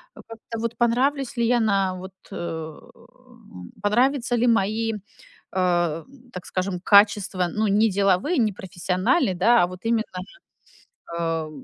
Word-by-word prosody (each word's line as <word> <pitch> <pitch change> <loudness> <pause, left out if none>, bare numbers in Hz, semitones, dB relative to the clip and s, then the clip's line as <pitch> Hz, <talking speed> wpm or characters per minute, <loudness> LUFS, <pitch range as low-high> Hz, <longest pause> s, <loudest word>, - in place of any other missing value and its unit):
как-то 225 0 -9
вот, 230 0 -3
понравлюсь 255 +2 +1
ли 235 - +2
я 245 0 +3
на 195 -4 +1
вот 185 +1 -9 0.2
э, - - -7
м 160 - -10
Понравятся 245 +3 +1
ли 240 +1 +1
мои, 225 0 +1
э, - - -4 0.6
так 180 - -2
скажем, 185 -1 -3
качества, 200 -3 +4
ну, 215 0 0
не 210 +3 +3
деловые, 200 - +1
не 220 -4 +2
профессиональны, 185 - 0
да, 230 +4 +4
а - - +2
вот 185 0 -10
именно, 225 -1 +1 1.1
а, 165 -2 -2
205 Hz, 135 wpm, -23 LUFS, 180-235 Hz, 1.1 s, качества